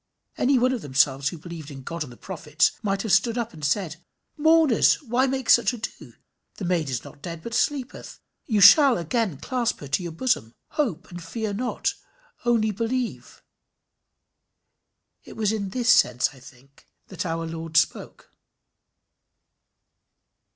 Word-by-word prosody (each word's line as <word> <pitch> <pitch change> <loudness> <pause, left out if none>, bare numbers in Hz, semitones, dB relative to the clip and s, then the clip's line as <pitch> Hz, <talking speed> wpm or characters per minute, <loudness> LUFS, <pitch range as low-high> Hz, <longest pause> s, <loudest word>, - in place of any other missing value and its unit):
Any 270 +1 +2
one 250 +1 +3
of 245 - -3
themselves 135 -1 +1
who 170 - -8
believed 160 -2 -9
in 135 -2 -10
God 170 +4 -6
and 135 - -11
the 120 - -14
prophets, 155 -5 0
might 195 -2 -1
have 220 - -2
stood 225 +6 +3
up 235 -1 -3
and 155 -2 -12
said 160 +2 -1 0.4
"Mourners, 315 -4 +4
why 255 +1 +1
make 265 -2 -3
such 235 0 +5
ado? 220 -2 -7 0.4
The 195 - -6
maid 170 -5 0
is 125 -3 -3
not 140 - -13
dead, 165 0 -7
but 230 - -7
sleepeth. 265 +2 -2 0.3
You 215 -4 +1
shall 275 +4 +8
again 175 - -1
clasp 240 - -2
her 145 - -8
to 150 - 0
your 170 -1 -5
bosom. 160 - -1
Hope, 235 - -2
and 175 0 -8
fear 215 +5 -4
not 245 +4 -2 0.5
only 225 -3 +2
believe." 230 +4 -4 1.8
It - - -13
was 215 -2 +1
in 205 -3 -3
this 245 +3 -1
sense, 125 - +4
I 135 - -16
think, 130 +2 -18 0.2
that 190 - -4
our 165 -1 -3
Lord 165 0 -4
spoke. - - -1
195 Hz, 160 wpm, -24 LUFS, 160-240 Hz, 1.8 s, shall